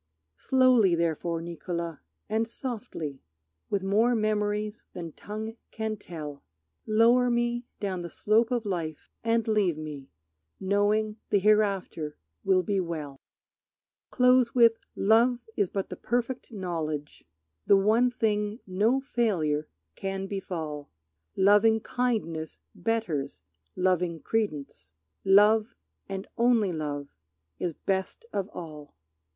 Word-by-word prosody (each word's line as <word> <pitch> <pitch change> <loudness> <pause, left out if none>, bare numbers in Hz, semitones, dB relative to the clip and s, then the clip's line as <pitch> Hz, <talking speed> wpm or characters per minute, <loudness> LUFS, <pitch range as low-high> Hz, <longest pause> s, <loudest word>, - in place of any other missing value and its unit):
Slowly 255 -8 +4
therefore, 165 0 -1
Niccolo, 170 -1 -4 0.3
and 225 +1 0
softly, 225 - -6 0.5
With 200 -2 0
more 220 +5 +3
memories 210 -1 -1
than 170 -3 -6
tongue 220 +6 -6
can 220 -1 -3
tell, 155 -7 -8 0.4
Lower 235 +3 +5
me 240 0 0
down 190 -3 -2
the 170 - -6
slope 220 +7 +2
of 240 -3 -1
life, 165 -6 -4
and 230 0 +1
leave 205 -7 +2
me 150 -3 -7 0.5
Knowing 205 +2 +1
the - - +4
hereafter 195 -7 +1 0.3
will 185 -1 +3
be 200 -1 0
well. 155 -6 -4 0.9
Close 250 -1 +4
with, 230 -2 +6 0.2
"Love 230 +4 +4 0.2
is 200 -4 +1
but 195 -1 -3
the - - -5
perfect 245 +2 -2
knowledge, 160 -7 -4 0.4
The 200 - +7
one 220 +5 +4
thing 215 -2 -1
no 215 +8 +2
failure 175 - 0 0.3
can 195 0 -3
befall; 165 -7 -5 0.5
Lovingkindness 210 -4 +2 0.2
betters 180 -8 -2 0.3
loving 180 -2 +1
credence; 150 - -3 0.3
Love 210 +3 +5 0.3
and 195 0 -5
only 230 -5 +4
love 145 -2 -4 0.5
is 175 - -1
best 190 +6 -2
of 200 -1 -2
all." 150 -4 -9
200 Hz, 110 wpm, -28 LUFS, 170-225 Hz, 0.9 s, The